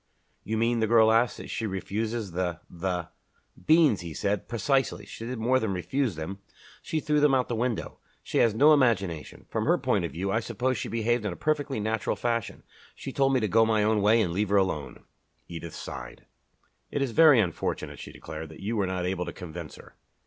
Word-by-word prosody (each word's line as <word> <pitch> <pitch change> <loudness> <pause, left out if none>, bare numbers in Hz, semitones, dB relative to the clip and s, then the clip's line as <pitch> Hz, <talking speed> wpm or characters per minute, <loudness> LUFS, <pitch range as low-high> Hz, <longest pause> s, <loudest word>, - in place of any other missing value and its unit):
"You 110 +1 -2
mean," 115 +1 +1
the 110 - +1
girl 110 0 +5
asked, 115 +2 +2
"that - - -8
she 115 - -2
refuses 105 +2 -3
the 90 -1 -2
the 90 -1 -3 0.3
" - - -25
"Beans," 155 - +5
he 85 -3 -7
said. 100 0 -1
"Precisely! 135 +2 0
She 115 - -8
did 125 0 -4
more 125 +4 +2
than 110 -5 -1
refuse 95 - -1
them 80 +5 -6 0.4
she 160 - -2
threw 150 0 +1
them 145 -2 +4
out 130 - +4
of - - -20
the 120 - -1
window. 120 0 -2 0.2
She - - -1
has 115 -2 +3
no 150 +6 +6
imagination. 100 - 0
From - - -2
her - - +4
point - - 0
of - - -4
view 95 +5 -2
I 110 - +2
suppose 120 +1 -2
she - - -3
behaved 115 0 0
in 105 - -2
a - - -6
perfectly 145 - -1
natural 110 +2 -1
fashion. 115 -2 -2 0.3
She - - -7
told 135 -1 +2
me 130 - +3
to 110 - +1
go 115 +3 +4
my 110 -1 +2
own 105 0 +2
way 110 +3 +5
and 85 -4 -2
leave 105 +2 0
her 100 - +3
alone." 95 -7 -1 0.4
Edith 85 -1 -7
sighed. - - -8 0.6
"It 140 - -1
is 130 - -2
very 150 -1 +7
unfortunate," 90 -6 -2
she - - -8
declared, 80 0 -8
"that 80 - -12
you 110 +4 -3
were 100 -3 +1
not 90 -1 -2
able 90 -1 -1
to - - -5
convince 85 -3 -8
her." - - -15
110 Hz, 220 wpm, -27 LUFS, 90-120 Hz, 0.6 s, very